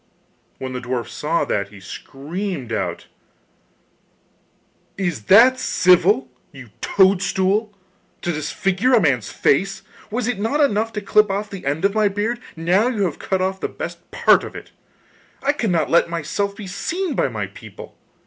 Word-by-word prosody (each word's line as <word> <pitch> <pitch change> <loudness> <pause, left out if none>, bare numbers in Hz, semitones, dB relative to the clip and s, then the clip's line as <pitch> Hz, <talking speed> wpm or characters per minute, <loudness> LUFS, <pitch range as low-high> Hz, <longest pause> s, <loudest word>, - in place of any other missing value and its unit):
When 130 -1 -5
the 125 - -3
dwarf 120 -1 -3
saw 160 +3 -1
that 100 -1 -1
he 100 -1 -13
screamed 140 - -6
out: - - -3 1.9
'Is 175 - -2
that 250 +6 +7
civil, 180 - +3 0.2
you 125 -5 -12
toadstool, 195 +2 +2 0.5
to 175 - 0
disfigure 195 - 0
a 240 - +7
man's 130 - +1
face? 195 +6 +1 0.3
Was 235 +2 -2
it 245 -5 -1
not 225 +8 0
enough 225 -6 +2
to 210 - -3
clip 210 +1 +3
off 205 +2 -3
the 190 -8 -7
end 150 +6 0
of 200 - +2
my 215 -1 +3
beard? 210 +4 -2 0.2
Now 180 +7 +2
you 225 -5 0
have 175 -6 -2
cut 190 -1 -1
off 190 0 -2
the - - -3
best - - -8
part - - +4
of - - -8
it. - - -10 0.7
I 280 - +3
cannot 185 - 0
let 170 0 +4
myself 185 +5 -2
be 210 - -8
seen 330 - -3
by - - +1
my - - -3
people. - - -12
190 Hz, 160 wpm, -21 LUFS, 160-210 Hz, 1.9 s, that